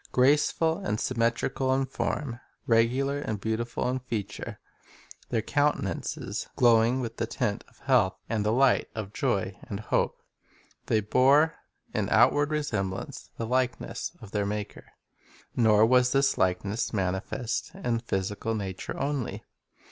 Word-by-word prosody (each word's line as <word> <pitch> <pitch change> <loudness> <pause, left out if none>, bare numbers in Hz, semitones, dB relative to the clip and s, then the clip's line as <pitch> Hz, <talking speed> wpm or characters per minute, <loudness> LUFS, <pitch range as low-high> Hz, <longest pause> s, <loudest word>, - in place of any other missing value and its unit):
Graceful 150 +5 +3
and 105 +1 -2
symmetrical 125 +2 0
in 135 0 +1
form, 130 -1 -3 0.3
regular 125 +5 +2
and 110 -7 -3
beautiful 110 +4 -2
in 130 +1 0
feature, 115 -5 -5 0.7
their 115 -3 0
countenances 145 - -1
glowing 120 +1 +4
with 115 -1 -5
the 115 - -1
tint 110 -3 -2
of - - -24
health 125 -8 +3
and 110 -2 0
the 105 - +1
light 130 +2 +3
of 105 -2 -5
joy 100 -9 0
and 100 - -3
hope, 110 - 0 0.7
they 110 - +2
bore 135 +9 +4 0.4
in 105 -2 0
outward 140 +5 +4
resemblance 100 -12 -3
the 115 - -2
likeness 125 +1 -1
of 105 -3 -12
their 105 -2 0
Maker. 105 0 -5 0.7
Nor 110 -2 +5
was 125 +1 +4
this 135 0 +3
likeness 95 +4 0
manifest 100 - -2
in 125 -12 -1
the 115 - -7
physical 105 +2 -2
nature 95 -3 -5
only. 140 -3 -2
115 Hz, 135 wpm, -28 LUFS, 105-130 Hz, 0.7 s, Nor